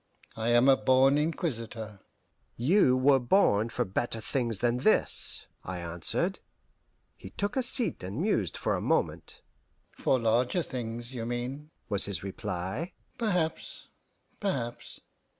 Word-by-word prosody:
I 115 Hz, +1 st, -1 dB
am 120 Hz, +2 st, +5 dB
a 135 Hz, -, +8 dB
born 135 Hz, +2 st, +4 dB
inquisitor." 115 Hz, -, -3 dB, 0.6 s
"You 130 Hz, -, +4 dB
were 135 Hz, +1 st, +5 dB
born 120 Hz, -, +3 dB
for -, -, -1 dB
better 115 Hz, +4 st, -2 dB
things 115 Hz, -1 st, -1 dB
than 120 Hz, +3 st, +1 dB
this," -, -, +1 dB, 0.2 s
I 95 Hz, 0 st, -5 dB
answered. 85 Hz, 0 st, 0 dB, 0.8 s
He 95 Hz, -, -11 dB
took 200 Hz, -, -3 dB
a 265 Hz, -, +2 dB
seat 245 Hz, -1 st, +1 dB
and 95 Hz, +7 st, -5 dB
mused 160 Hz, -, 0 dB
for -, -, 0 dB
a -, -, -1 dB
moment. -, -, -1 dB, 0.5 s
"For 130 Hz, -, +1 dB
larger 120 Hz, +8 st, +1 dB
things, 120 Hz, -1 st, -6 dB
you 115 Hz, -2 st, -4 dB
mean," 125 Hz, +5 st, -4 dB, 0.2 s
was 100 Hz, -1 st, 0 dB
his 100 Hz, -2 st, -2 dB
reply. 95 Hz, -, -4 dB, 0.3 s
"Perhaps 180 Hz, -8 st, -2 dB, 0.5 s
perhaps. 125 Hz, -, -4 dB
120 Hz, 135 wpm, -29 LUFS, 110-145 Hz, 0.8 s, a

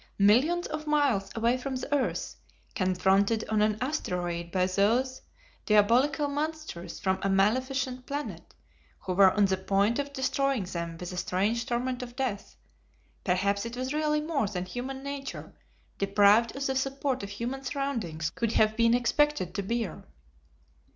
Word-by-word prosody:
Millions 260 Hz, +13 st, +4 dB
of 310 Hz, 0 st, -5 dB
miles 280 Hz, -10 st, +2 dB
away 230 Hz, +2 st, +2 dB
from 265 Hz, +1 st, -4 dB
the 260 Hz, +3 st, -4 dB
earth, 275 Hz, -, -1 dB, 0.4 s
confronted 195 Hz, +2 st, +2 dB
on 215 Hz, -1 st, +2 dB
an 215 Hz, 0 st, +2 dB
asteroid 175 Hz, -, -2 dB
by 185 Hz, 0 st, +2 dB
these 225 Hz, +8 st, +1 dB, 0.5 s
diabolical 245 Hz, +8 st, +4 dB
monsters 300 Hz, -, -4 dB
from 190 Hz, -1 st, 0 dB
a 195 Hz, -, 0 dB
maleficient 255 Hz, +6 st, 0 dB
planet, 290 Hz, +1 st, -6 dB, 0.5 s
who 185 Hz, -, -3 dB
were 190 Hz, +1 st, +7 dB
on 205 Hz, +2 st, +3 dB
the 190 Hz, -1 st, +1 dB
point 200 Hz, +5 st, +1 dB
of 285 Hz, 0 st, -3 dB
destroying 275 Hz, -3 st, 0 dB
them 170 Hz, -2 st, -5 dB
with 180 Hz, 0 st, -6 dB
a -, -, -6 dB
strange 205 Hz, +7 st, 0 dB
torment 250 Hz, 0 st, -1 dB
of 245 Hz, -1 st, -8 dB
death 250 Hz, -7 st, -3 dB, 0.7 s
perhaps 200 Hz, +2 st, +1 dB
it 235 Hz, +1 st, -6 dB
was 255 Hz, +2 st, -2 dB
really 300 Hz, 0 st, +1 dB
more 300 Hz, -7 st, 0 dB
than 185 Hz, -2 st, -4 dB
human 260 Hz, +6 st, -6 dB
nature, 280 Hz, -1 st, -6 dB, 0.5 s
deprived 205 Hz, +4 st, +4 dB
of 275 Hz, 0 st, -3 dB
the 265 Hz, -, 0 dB
support 270 Hz, 0 st, -1 dB
of 200 Hz, -, -6 dB
human 235 Hz, +6 st, -4 dB
surroundings, 230 Hz, -, -3 dB
could 230 Hz, -1 st, -2 dB
have 215 Hz, 0 st, +3 dB
been 230 Hz, +1 st, +4 dB
expected 245 Hz, -, +1 dB
to 200 Hz, -, -2 dB
bear. 225 Hz, 0 st, -3 dB
235 Hz, 155 wpm, -28 LUFS, 195-270 Hz, 0.7 s, were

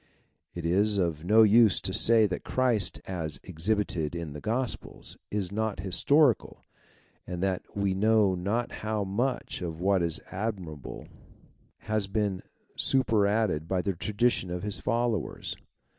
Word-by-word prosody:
It 85 Hz, -1 st, -5 dB
is 100 Hz, +5 st, +2 dB
of 85 Hz, -5 st, -1 dB
no 110 Hz, +5 st, +6 dB
use 110 Hz, -1 st, +6 dB
to 95 Hz, -, -3 dB
say 110 Hz, +1 st, +5 dB
tliatTJKrist 110 Hz, +1 st, 0 dB
as 80 Hz, -5 st, -4 dB
exhibited 90 Hz, -3 st, -1 dB
in 85 Hz, -4 st, -5 dB
the 75 Hz, -, -8 dB
Gospels 120 Hz, -, -3 dB
is 100 Hz, -3 st, -2 dB
not 110 Hz, 0 st, -2 dB
historical 135 Hz, -, +2 dB, 0.6 s
and 90 Hz, 0 st, -4 dB
that 95 Hz, -2 st, 0 dB, 0.2 s
we 100 Hz, -1 st, +1 dB
know 105 Hz, 0 st, +3 dB
not 100 Hz, +7 st, -1 dB
how 110 Hz, -1 st, -1 dB
much 115 Hz, +6 st, -2 dB
of 80 Hz, -2 st, -5 dB
what 95 Hz, +1 st, +2 dB
is 85 Hz, -2 st, -1 dB
admirable 95 Hz, -, -5 dB, 0.8 s
Eas 110 Hz, -2 st, 0 dB
been 100 Hz, -2 st, -1 dB, 0.3 s
superadded 105 Hz, -, +1 dB
by 90 Hz, 0 st, 0 dB
the 100 Hz, -, 0 dB
tradition 105 Hz, +2 st, 0 dB
of 90 Hz, +1 st, -4 dB
his 105 Hz, -1 st, -2 dB
followers. 115 Hz, -5 st, -1 dB
100 Hz, 135 wpm, -28 LUFS, 90-110 Hz, 0.8 s, no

